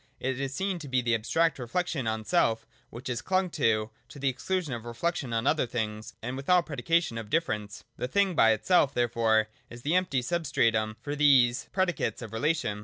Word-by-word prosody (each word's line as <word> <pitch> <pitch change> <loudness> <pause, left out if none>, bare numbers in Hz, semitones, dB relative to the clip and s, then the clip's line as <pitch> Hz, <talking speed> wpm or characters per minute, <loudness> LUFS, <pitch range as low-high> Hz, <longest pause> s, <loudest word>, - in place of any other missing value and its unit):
It 130 0 -2
is 135 -1 -2
seen 190 +5 -2
to 150 - -8
be 130 -1 +1
the 120 0 +1
abstract 145 +8 +1
reflection 135 +1 -2
on 110 0 -2
self, 110 +2 +2 0.2
which 120 +4 -9
is 120 -2 -2
clung 185 -1 0
to, 110 -6 +1 0.2
to - - -12
the 140 -1 +1
exclusion 155 +3 -2
of 115 -2 -5
reflection 120 +3 -3
on 115 0 -1
other 155 -5 +2
things 110 -2 -4
and 125 +3 -4
of 135 - -8
all 180 -1 +5
predication 160 -3 0
of 110 -2 -8
difference. 105 -10 -2
The - - -2
thing 195 +6 +2
by 115 -8 +5
itself 140 - +2
therefore 115 -2 +2 0.2
is 120 +1 -11
the 150 - 0
empty 180 -9 +1
substratum 115 -9 0
for 145 0 -3
these 135 -4 +4
predicates 180 -9 -1
of 110 -1 -9
relation. 130 -3 0
130 Hz, 195 wpm, -28 LUFS, 115-165 Hz, 0.2 s, all